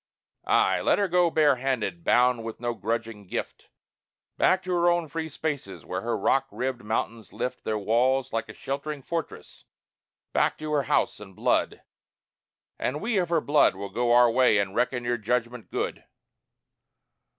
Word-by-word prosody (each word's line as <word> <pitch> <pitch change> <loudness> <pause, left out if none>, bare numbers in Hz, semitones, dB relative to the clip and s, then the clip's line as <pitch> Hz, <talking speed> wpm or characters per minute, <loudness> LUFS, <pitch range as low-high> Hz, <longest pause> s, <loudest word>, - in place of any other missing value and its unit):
Ay! - - +3
Let - - +3
her 200 - +1
go 180 -1 +3
bare 150 -4 +3
handed, 135 +6 -2
bound 125 -4 +3
with 115 -1 -6
no 120 0 -2
grudging 110 -1 -4
gift, - - -5 0.7
Back 185 0 +3
to 185 - -4
her 175 0 +3
own 175 -1 +1
free 160 +1 -4
spaces 145 -10 -5
where 90 +1 -3
her 115 +2 -1
rock 135 0 +2
ribbed 130 -1 -3
mountains 110 0 -3
lift 125 0 -4
Their 110 - -1
walls 125 +5 +1
like 115 -1 -2
a - - -7
sheltering 140 +1 -5
fortress 165 +1 -6 0.7
back - - +2
to 155 0 -5
her 145 -2 +2
house - - +1
and 95 -3 -12
blood. - - 0 1.0
And 145 +4 -1
we 220 0 0
of 175 - -1
her 165 -2 +2
blood 145 -9 +3
will 100 +1 -6
go 120 0 0
our 120 0 +6
way 125 -3 +4
and 100 -1 0
reckon 125 +1 0
your 120 0 0
judgment 120 +2 -2
good. - - -3
125 Hz, 170 wpm, -26 LUFS, 115-155 Hz, 1.0 s, our